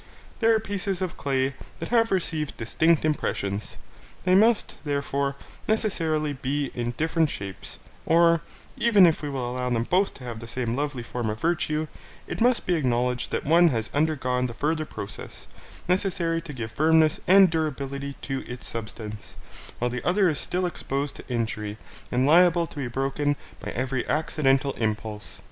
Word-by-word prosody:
They 225 - +2
are 225 -1 +5
pieces 200 -3 -2
of 185 -3 -3
clay 135 -1 0 0.3
that - - -5
have 230 -1 +3
received 160 -5 -1
distinct 160 +8 +2
impressions: 105 -9 -2 0.5
they 185 - +3
must, 220 +3 +4
therefore, 140 -1 -1 0.3
necessarily 160 -9 +1
be 140 +1 -2
in 120 0 -3
different 160 0 +2
shapes; 100 -5 -6 0.3
or, 170 0 +5 0.3
even 210 -5 +6
if 165 -2 +3
we 145 - -3
allow 125 -2 -2
them 115 -2 +1
both 185 +9 +1
to 130 - -11
have 120 -2 -6
the 115 - -9
same 120 -1 -2
lovely 140 -3 -2
form 120 -1 -3
of 105 +1 -4
virtue, 155 -2 0 0.4
it - - -5
must 245 +1 +3
be 180 - +1
acknowledged 125 -5 0
that - - -2
one 170 +4 +6
has 115 -7 -1
undergone 130 -5 +1
the 115 - -8
further 155 +4 0
process, 100 - -7 0.4
necessary 175 -3 +1
to 165 - -8
give 115 -5 -5
firmness 155 +4 +4
and 190 -1 +7
durability 140 -3 -2
to 135 -1 -2
its 125 - -7
substance, 110 -2 -6 0.4
while 120 0 -1
the 125 0 -4
other 190 +2 +3
is 150 - -1
still 180 +1 -1
exposed 140 -4 -3
to - - -12
injury, 110 -3 -2 0.3
and 125 +1 +2
liable 170 +2 +5
to 160 - -13
be 135 -3 -2
broken 135 +3 0 0.2
by - - -6
every 130 0 -1
accidental 140 -3 +2
impulse. 110 -1 -3
145 Hz, 165 wpm, -26 LUFS, 125-170 Hz, 0.5 s, and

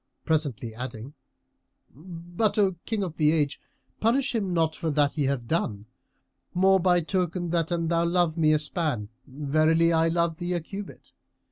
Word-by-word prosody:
presently 140 -8 -1
adding, 125 +2 -7 0.8
"But, 175 - -3
O 200 -2 +4 0.2
King 220 -3 -1
of 175 -3 -5
the 150 -1 +4
Age, 150 -3 0 0.4
punish 255 +4 +1
him 205 -5 -1
not 165 -2 +1
for 165 0 -3
that 145 -1 +2
he 150 -3 0
hath 135 -3 -1
done; 110 -8 -2 0.7
more 190 +1 +5
by 180 -1 +3
token 175 0 -2
that 165 -2 0
an 170 -1 -1
thou 170 0 +1
love 170 -2 +1
me 155 -2 +3
a 155 - +4
span, 150 -8 -2 0.2
verily 155 +4 +2
I 165 0 +3
love 170 -1 0
thee 175 +1 -2
a 175 - 0
cubit. 195 +5 -9
165 Hz, 165 wpm, -26 LUFS, 150-175 Hz, 0.8 s, more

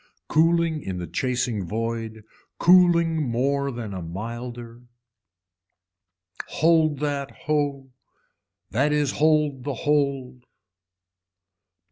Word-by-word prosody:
Cooling 165 0 +2
in 95 -6 -5
the 90 - -4
chasing 125 -4 -2
void, 115 0 -4 0.3
cooling 170 -2 +4
more 140 +4 0
than 120 -5 -6 0.2
milder. 120 +3 -7 1.7
Hold 160 -2 +2
that 140 -2 -2 0.2
ho, 145 -3 -1 0.8
that 140 +8 +1
is 150 -2 +1
hold 150 -3 +1
the 140 -1 -3
hold. 135 -3 -1
140 Hz, 85 wpm, -24 LUFS, 120-150 Hz, 1.7 s, cooling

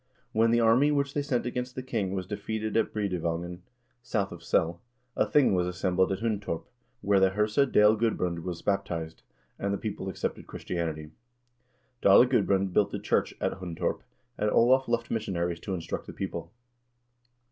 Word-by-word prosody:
When 115 +1 +3
the 120 +1 +3
army 115 +5 +5
which 140 -1 0
they 145 - 0
sent 140 -4 -1
against 125 +1 -3
the 130 - -4
king 105 -7 -2
was 95 -1 -3
defeated 110 +2 -4
at 115 - +2
Breidevangen, 90 -3 -2 0.4
south 100 -5 -1
of 85 -1 -10
Sell, 85 +1 +1 0.3
a - - +2
thing 145 -8 +4
was 90 -1 +1
assembled 90 +1 +1
at 95 +1 -2
Hundtorp, 105 -7 -2 0.4
where 100 0 +3
the 95 0 +5
herse 105 +5 0
Dale 105 +1 +6
Gudbrand 95 -6 0
was 85 0 -6
baptized, 85 -5 -2 0.4
and 100 - -1
the 100 - 0
people 100 -2 -4
accepted 95 - -4
Christianity. 80 -3 -4 0.9
Dale 100 +5 +7
Gudbrand 100 -6 +1
built 105 - +3
a - - -3
church - - 0
at - - -2
Hundtorp, 85 -3 -3 0.4
and 105 - +2
Olav 130 +4 +4
left 120 0 -1
missionaries 90 -6 -2
to 95 +2 -4
instruct 85 -2 -5
the - - -8
people. - - -5
100 Hz, 170 wpm, -28 LUFS, 90-115 Hz, 0.9 s, Dale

